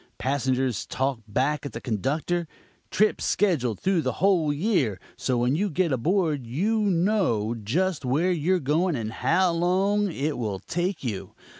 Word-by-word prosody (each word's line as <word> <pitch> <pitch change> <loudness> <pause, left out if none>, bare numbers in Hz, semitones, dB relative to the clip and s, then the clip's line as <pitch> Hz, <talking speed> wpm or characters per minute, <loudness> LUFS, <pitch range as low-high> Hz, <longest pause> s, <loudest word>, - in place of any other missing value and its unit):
Passengers 130 -3 -1
talk 135 -2 -1
back 135 +7 0
at 140 - -6
the - - -5
conductor. 150 - -1 0.4
Trips 215 +2 +2
scheduled 135 - +1
through 190 -3 +1
the - - -1
whole 180 -6 +2
year, 145 - 0 0.2
so 125 0 -1
when 125 +3 +2
you 200 +5 0
get 175 0 0
aboard 155 - +1
you 200 - 0
know 180 - +1
just 150 - -1
where 150 +9 +1
you're 180 +2 +1
going 160 +4 +1
and 110 -3 -3
how 185 +9 +2
long 190 +4 +1
it 145 -3 -2
will 105 -5 -2
take 175 - -3
you. 110 -7 -5
155 Hz, 155 wpm, -25 LUFS, 125-185 Hz, 0.4 s, Trips